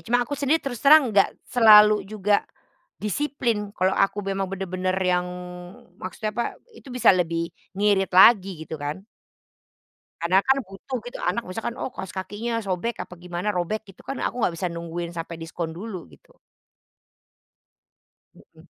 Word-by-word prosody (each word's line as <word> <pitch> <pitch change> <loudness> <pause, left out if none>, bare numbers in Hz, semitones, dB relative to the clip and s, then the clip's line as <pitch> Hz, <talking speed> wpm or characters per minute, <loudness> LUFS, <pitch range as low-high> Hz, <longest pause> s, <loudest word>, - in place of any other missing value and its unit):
Cuma 245 +1 +1
aku 290 - -9
sendiri 285 +2 +1
terus 245 -5 -4
terang, 280 -5 +6
nggak 200 -1 +5 0.2
selalu 210 -4 +6
juga 210 -1 +1 0.6
disiplin, 235 -2 -1
kalo 185 +1 +2
aku 195 +1 +1
memang 195 0 -1
bener-bener 185 -1 -2
yang 180 -1 +1 0.7
maksudnya 215 +3 -4
apa? 235 +2 -1 0.3
Itu 300 - -15
bisa 250 - +5
lebih 170 -2 -1 0.2
ngirit 200 -1 +2
lagi, 190 -5 +6
gitu 160 -2 -7
kan. 150 +7 -5 1.2
Karena 180 +3 +3
kan 265 +1 +4
butuh 195 +7 -7
gitu. 245 - -8
Anak 235 - -1
misalkan, 225 +6 -5
oh 260 - -4
kaos 190 - -7
kakinya 225 +5 -3
sobek, 195 +5 -2
apa - - -12
gimana, 180 +3 -3
robek 205 +5 -2
gitu - - -23
kan, 275 - -6
aku 250 - -2
nggak 170 - +1
bisa 180 - -2
nungguin 170 0 -5
sampai 165 0 -6
diskon 165 0 -6
dulu, 190 - -7
gitu. 75 - -22 2.0
Mhm. - - -20
195 Hz, 150 wpm, -24 LUFS, 180-230 Hz, 2.0 s, terang